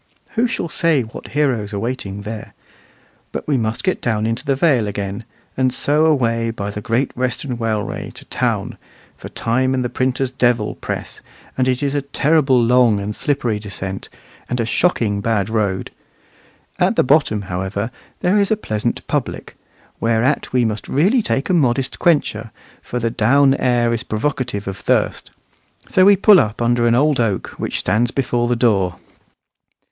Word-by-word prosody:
Who 240 Hz, +1 st, +1 dB
shall 205 Hz, -, -3 dB
say 165 Hz, -5 st, +2 dB
what 110 Hz, -, -10 dB
heroes 120 Hz, -8 st, 0 dB
are -, -, -2 dB
waiting 100 Hz, -4 st, -4 dB
there? 110 Hz, +1 st, -7 dB, 0.8 s
But -, -, -5 dB
we 145 Hz, -, +2 dB
must 110 Hz, +1 st, -1 dB
get 185 Hz, -1 st, 0 dB
down 110 Hz, -2 st, 0 dB
into 115 Hz, +3 st, -2 dB
the 140 Hz, -2 st, +1 dB
Vale 130 Hz, -7 st, +2 dB
again, 100 Hz, +2 st, -4 dB, 0.3 s
and 130 Hz, -1 st, +2 dB
so 150 Hz, +4 st, +2 dB
away 115 Hz, -6 st, +1 dB
by 100 Hz, -3 st, -4 dB
the 105 Hz, -, -6 dB
Great 115 Hz, +4 st, -1 dB
Western 125 Hz, +1 st, -2 dB
Railway 110 Hz, -3 st, -3 dB
to -, -, -11 dB
town, -, -, -2 dB, 0.4 s
for -, -, -10 dB
time 130 Hz, +3 st, 0 dB
and 130 Hz, -1 st, -1 dB
the -, -, -1 dB
printer's 130 Hz, +1 st, -1 dB
devil 120 Hz, -4 st, +1 dB
press, -, -, -6 dB, 0.3 s
and 130 Hz, -1 st, +1 dB
it 130 Hz, +2 st, 0 dB
is 140 Hz, -1 st, 0 dB
a 145 Hz, -, 0 dB
terrible 140 Hz, -1 st, +2 dB
long 120 Hz, -2 st, +4 dB
and 105 Hz, +1 st, -4 dB
slippery 125 Hz, -7 st, -1 dB
descent, 95 Hz, -2 st, -6 dB, 0.4 s
and 125 Hz, -, -2 dB
a 115 Hz, -, +1 dB
shocking 110 Hz, -, +1 dB
bad 105 Hz, -2 st, 0 dB
road. 105 Hz, -4 st, -1 dB, 0.9 s
At -, -, +2 dB
the -, -, +4 dB
bottom, 130 Hz, -7 st, +2 dB
however, 95 Hz, +4 st, -3 dB, 0.3 s
there 185 Hz, +4 st, +2 dB
is 200 Hz, -1 st, +2 dB
a 220 Hz, -, +2 dB
pleasant 110 Hz, -, -3 dB
public; -, -, -3 dB, 0.5 s
whereat 115 Hz, +4 st, +1 dB
we 125 Hz, -2 st, +2 dB
must 110 Hz, -2 st, -3 dB
really 195 Hz, -, +3 dB
take 145 Hz, -7 st, -1 dB
a -, -, +1 dB
modest 135 Hz, -4 st, +1 dB
quencher, 125 Hz, -9 st, +1 dB, 0.3 s
for 125 Hz, -, -5 dB
the 115 Hz, -1 st, -1 dB
down 135 Hz, +5 st, +4 dB
air 120 Hz, -3 st, +1 dB
is 115 Hz, -, -1 dB
provocative 115 Hz, -3 st, -2 dB
of 95 Hz, -, -4 dB
thirst. -, -, 0 dB, 0.6 s
So 185 Hz, -, +4 dB
we 200 Hz, 0 st, +7 dB
pull 200 Hz, 0 st, +6 dB
up 105 Hz, -5 st, -1 dB
under 120 Hz, 0 st, +2 dB
an 115 Hz, -, +4 dB
old 145 Hz, +1 st, +3 dB
oak 110 Hz, -5 st, 0 dB
which -, -, -2 dB
stands 115 Hz, +2 st, +1 dB
before 120 Hz, -2 st, 0 dB
the 120 Hz, -, +1 dB
door. 100 Hz, -7 st, +2 dB
120 Hz, 170 wpm, -19 LUFS, 110-140 Hz, 0.9 s, we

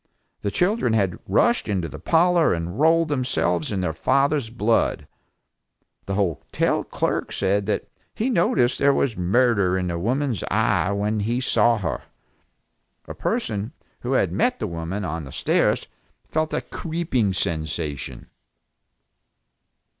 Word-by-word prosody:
The 100 Hz, -, -1 dB
children 180 Hz, -, +1 dB
had 100 Hz, -5 st, +1 dB
rushed 235 Hz, -, +2 dB
into 95 Hz, -5 st, -1 dB
the 75 Hz, 0 st, -9 dB
parlor 165 Hz, -, +3 dB
and 85 Hz, +6 st, -5 dB
rolled 165 Hz, +1 st, +4 dB
themselves 125 Hz, -, 0 dB
in 100 Hz, -3 st, -1 dB
their 80 Hz, -3 st, -1 dB
father's 140 Hz, -, +1 dB
blood. 115 Hz, 0 st, 0 dB, 1.0 s
The 100 Hz, -, -1 dB
hotel 95 Hz, -6 st, 0 dB
clerk -, -, -2 dB
said 100 Hz, +1 st, 0 dB
that 110 Hz, -, -1 dB, 0.3 s
he 225 Hz, -, -1 dB
noticed 150 Hz, -, +2 dB
there 140 Hz, 0 st, +4 dB
was 125 Hz, -6 st, +1 dB
murder 100 Hz, 0 st, +2 dB
in 90 Hz, -1 st, -1 dB
the 85 Hz, 0 st, -2 dB
woman's 125 Hz, -, -1 dB
eye 100 Hz, -4 st, +2 dB
when 105 Hz, +2 st, 0 dB
he 115 Hz, +4 st, 0 dB
saw 120 Hz, -2 st, +3 dB
her. 100 Hz, -, -3 dB, 1.1 s
A -, -, -6 dB
person 110 Hz, +4 st, -2 dB, 0.3 s
who 125 Hz, +2 st, -2 dB
had -, -, +2 dB
met 250 Hz, +2 st, +1 dB
the -, -, -3 dB
woman 85 Hz, +3 st, -4 dB
on 80 Hz, 0 st, -3 dB
the 65 Hz, -, -9 dB
stairs -, -, +1 dB, 0.4 s
felt 155 Hz, 0 st, -1 dB
a -, -, -1 dB
creeping 145 Hz, -, -1 dB
sensation. 80 Hz, -5 st, -3 dB
105 Hz, 140 wpm, -23 LUFS, 90-140 Hz, 1.1 s, rolled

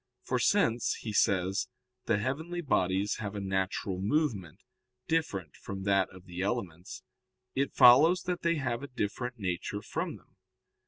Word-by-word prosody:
For -, -, -1 dB
since, 115 Hz, +1 st, +2 dB
he 110 Hz, -, -5 dB
says, 95 Hz, 0 st, +2 dB, 0.4 s
the 110 Hz, -, +2 dB
heavenly 160 Hz, +10 st, -3 dB
bodies 95 Hz, -, +1 dB
have 105 Hz, -1 st, -5 dB
a -, -, -3 dB
natural 95 Hz, -1 st, -2 dB
movement, 105 Hz, -, -1 dB, 0.5 s
different 100 Hz, -, -1 dB
from 95 Hz, -1 st, -7 dB
that 100 Hz, -1 st, +2 dB
of 90 Hz, 0 st, -14 dB
the 90 Hz, 0 st, -6 dB
elements, 95 Hz, -5 st, -4 dB, 0.5 s
it 140 Hz, +1 st, -1 dB
follows 150 Hz, +9 st, +7 dB
that 180 Hz, -1 st, -2 dB
they 170 Hz, 0 st, +2 dB
have 125 Hz, -5 st, -2 dB
a 140 Hz, -, -6 dB
different 125 Hz, +1 st, -3 dB
nature 95 Hz, +1 st, -3 dB
from -, -, -3 dB
them. -, -, -27 dB
105 Hz, 150 wpm, -30 LUFS, 95-135 Hz, 0.5 s, follows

